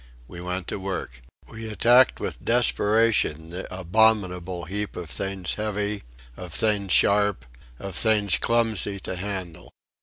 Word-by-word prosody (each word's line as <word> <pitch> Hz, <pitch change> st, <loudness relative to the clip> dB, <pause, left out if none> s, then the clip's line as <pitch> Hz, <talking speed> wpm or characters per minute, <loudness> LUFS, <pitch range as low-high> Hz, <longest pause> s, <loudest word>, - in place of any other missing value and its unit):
We 85 Hz, +5 st, -10 dB
went 90 Hz, 0 st, -4 dB
to -, -, -4 dB
work. 95 Hz, -10 st, -5 dB, 0.3 s
We 115 Hz, 0 st, -8 dB
attacked 120 Hz, +4 st, +4 dB
with -, -, -5 dB
desperation 110 Hz, -8 st, +2 dB
the 90 Hz, +2 st, -7 dB
abominable 95 Hz, -2 st, +1 dB
heap 105 Hz, +4 st, -3 dB
of 85 Hz, -3 st, -7 dB
things 95 Hz, -3 st, -2 dB
heavy, 105 Hz, -1 st, -3 dB, 0.3 s
of 90 Hz, -3 st, -9 dB
things 100 Hz, -1 st, +2 dB
sharp, 100 Hz, -11 st, +3 dB, 0.3 s
of 95 Hz, +3 st, -7 dB
things 105 Hz, -6 st, +2 dB
clumsy 110 Hz, -4 st, +1 dB
to 95 Hz, -, -5 dB
handle. 95 Hz, -3 st, -6 dB
100 Hz, 130 wpm, -24 LUFS, 90-110 Hz, 0.3 s, attacked